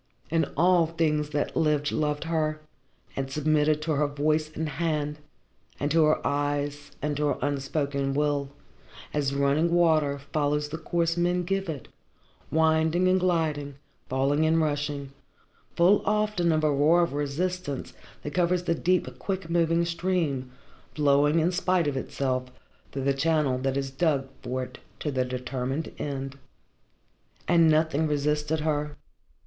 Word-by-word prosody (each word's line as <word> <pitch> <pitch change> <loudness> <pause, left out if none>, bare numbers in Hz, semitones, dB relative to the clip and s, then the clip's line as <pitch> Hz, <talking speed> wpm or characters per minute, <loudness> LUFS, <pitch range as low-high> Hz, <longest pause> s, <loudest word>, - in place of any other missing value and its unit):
And 165 -3 +1
all 175 0 +4
things 155 -2 0
that 150 -1 -2
lived, 150 -2 +1
loved 150 -1 -1
her, 155 -2 -1 0.6
and 135 0 -3
submitted 150 +1 +1
to 160 - -1
her 150 0 +2
voice 155 +2 0
and 160 0 -2
hand, 150 -2 -2 0.6
and 145 +1 -1
to 160 0 +5
her 155 - +1
eyes 145 0 -1
and 150 0 0
to 150 0 +1
her - - 0
unspoken 140 -1 -1
will, 145 -1 0 0.6
as 140 -2 0
running 140 +4 +2
water 160 -5 +3
follows 145 +1 -1
the 160 +2 -5
course 170 +1 0
men 175 +1 +1
give 195 0 -2
it, 145 -6 -5 0.6
winding 160 +2 +3
and 185 0 +4
gliding, 155 -6 0 0.3
falling 135 +4 +1
and 160 +1 +3
rushing, 145 -2 -2 0.6
full 185 +4 +5
often 210 -5 +1
of 155 -1 +1
a 155 - +3
roar 155 +5 +4
of 170 - -2
resistance 145 +1 -3 0.3
that 150 - -5
covers 180 0 +1
the 170 - +1
deep, 180 +2 0
quick 190 -4 -4
moving 170 0 +2
stream, 165 -7 -1 0.4
flowing 145 +1 +3
in 165 +3 +2
spite 180 -1 +1
of 145 - -1
itself 130 -1 -2 0.4
through 135 - -4
the 140 0 +2
channel 145 -2 +1
that 135 +1 -1
is 135 -1 -2
dug 135 -2 0
for 130 +1 -3
it - - -10 0.2
to 150 - -2
the 130 -2 +1
determined 125 +3 -3
end. 140 -1 -4 1.1
And 170 -2 +5
nothing 155 0 +2
resisted 150 +1 0
her. 150 -1 -1
150 Hz, 150 wpm, -27 LUFS, 140-165 Hz, 1.1 s, to